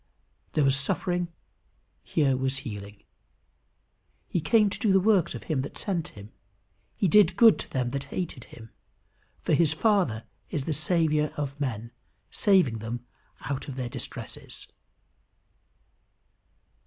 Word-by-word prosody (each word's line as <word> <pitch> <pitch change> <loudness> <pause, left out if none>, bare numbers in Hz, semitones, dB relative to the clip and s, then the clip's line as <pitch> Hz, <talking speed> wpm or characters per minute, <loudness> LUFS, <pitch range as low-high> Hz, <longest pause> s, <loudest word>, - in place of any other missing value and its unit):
There 150 - +3
was 135 -1 +4
suffering; 175 +5 +1 0.7
here 140 -4 +1
was 130 +1 0
healing. 105 -2 -8 1.2
He 175 - -1
came 215 +4 +4
to - - -5
do 215 -5 +2
the 190 - +6
works 195 -3 +3
of - - -7
him 150 -5 -1
that 140 - -7
sent 175 -6 -2
him. 105 +1 -12 0.7
He 195 - +2
did 185 -1 +5
good 225 -1 +7
to - - -5
them 125 -2 -1
that 140 0 -3
hated 165 -9 -5
him, 115 -2 -13 0.7
for - - +1
his 165 -2 +4
Father 165 - +2 0.3
is 145 - -2
the 160 - 0
Saviour 155 -1 +1
of 140 -1 -4
men, 115 -4 -3 0.4
saving 180 - +3
"them 115 +2 -5 0.4
out 135 +1 -4
of 135 - -6
their 125 -2 -3
distresses." - - -7
145 Hz, 140 wpm, -27 LUFS, 125-180 Hz, 1.2 s, good